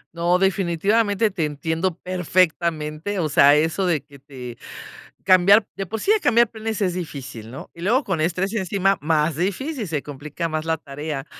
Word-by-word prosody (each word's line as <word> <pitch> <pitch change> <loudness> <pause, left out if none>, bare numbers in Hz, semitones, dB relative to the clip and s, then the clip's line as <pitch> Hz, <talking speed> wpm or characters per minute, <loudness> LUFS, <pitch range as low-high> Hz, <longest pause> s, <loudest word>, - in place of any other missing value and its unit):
No, 170 +1 +2
definitivamente 195 +3 +1
te 180 -4 -2
entiendo 160 +4 -2
perfectamente, 170 -1 0
o 165 -4 0
sea, 140 0 +6
eso 160 +5 +1
de 160 -5 +1
que 140 -1 -17
te 125 -3 -10 0.7
cambiar 195 +3 +6
de 195 - -3
por 220 +4 -4
sí 410 - +2
ya 435 - +4
cambiar 235 - +3
planes 220 -1 -4
es 185 -3 +1
difícil, 135 -10 -7
¿no?, 135 - -10
y - - -17
luego 235 +10 +2
con 190 -9 -2
estrés 180 +5 -1
encima 195 -1 +1
más 155 0 +1
difícil, 215 - -2
se 150 -4 -3
complica 150 +4 -5
más 155 0 -3
la 165 0 +1
tarea, 145 -1 -6
170 Hz, 175 wpm, -22 LUFS, 150-195 Hz, 0.7 s, sea